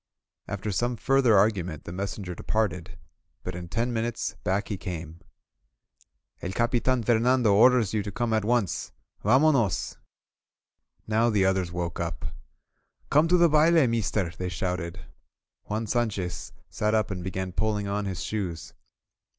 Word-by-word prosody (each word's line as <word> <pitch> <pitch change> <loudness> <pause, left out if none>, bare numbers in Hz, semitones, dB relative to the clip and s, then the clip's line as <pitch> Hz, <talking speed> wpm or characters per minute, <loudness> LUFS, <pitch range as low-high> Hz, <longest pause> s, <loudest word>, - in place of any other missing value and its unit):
After 100 +1 -3
some 120 +5 0
further 130 -2 +4
argument 95 -6 +1
the - - -8
messenger 95 -1 -4
departed, 90 -3 -2 0.5
but 90 - -4
in 90 0 -7
ten 115 +5 -1
minutes 115 -3 -2
back 95 +3 -1
he 105 - -1
came. 85 -4 -6 1.2
*TE1 90 - -4
Capitan 120 +1 +1
Fernando 120 0 +3
orders 115 -1 +5
you 110 - +1
to 100 0 -5
come 120 +2 -1
at 110 -1 +2
once! 115 -3 0 0.3
VamonosF* 130 - +3 1.1
Now 110 +2 +2
the 100 -4 +2
others 95 -2 +1
woke 85 -1 -3
up. 85 -8 -4 0.9
"Come 150 +3 +5
to 180 +2 +4
the 170 -1 +6
baile, 160 0 +5
meester!" 105 -5 0
they 90 0 -3
shouted. 90 +1 -4 0.6
Juan 110 +2 -2
Sanchez 105 -5 -2 0.2
sat 105 +1 0
up 110 0 +1
and 90 -2 -4
began 95 0 -3
pulling 105 +1 -1
on 100 +1 -2
his 95 0 -4
shoes. 95 -7 -4
105 Hz, 140 wpm, -27 LUFS, 90-120 Hz, 1.2 s, the